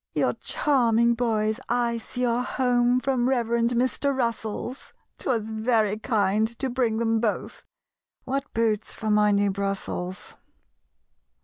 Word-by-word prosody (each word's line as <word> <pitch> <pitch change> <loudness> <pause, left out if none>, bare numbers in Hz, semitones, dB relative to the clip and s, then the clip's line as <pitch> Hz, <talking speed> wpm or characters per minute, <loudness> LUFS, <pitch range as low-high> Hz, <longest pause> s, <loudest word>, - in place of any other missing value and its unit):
"Your - - +1
charming 235 -5 +2
boys 220 -2 0
I 235 -1 +1
see 250 +2 -3
are 240 0 +1
home 250 -1 +2
From 255 -1 0
Reverend 235 -2 +1
Mr. 260 +3 0
Russell's; 235 +1 -3 0.3
'Twas 225 -4 -1
very 220 -2 +1
kind 215 -1 +1
to 265 - -2
bring 240 -3 0
them 225 -1 +1
both 220 -2 -2 0.6
(What 275 +2 -3
boots 220 -2 0
for 220 -1 -3
my 210 0 +4
new 200 0 +2
Brussels!) 190 -2 -3
230 Hz, 125 wpm, -25 LUFS, 215-245 Hz, 0.6 s, my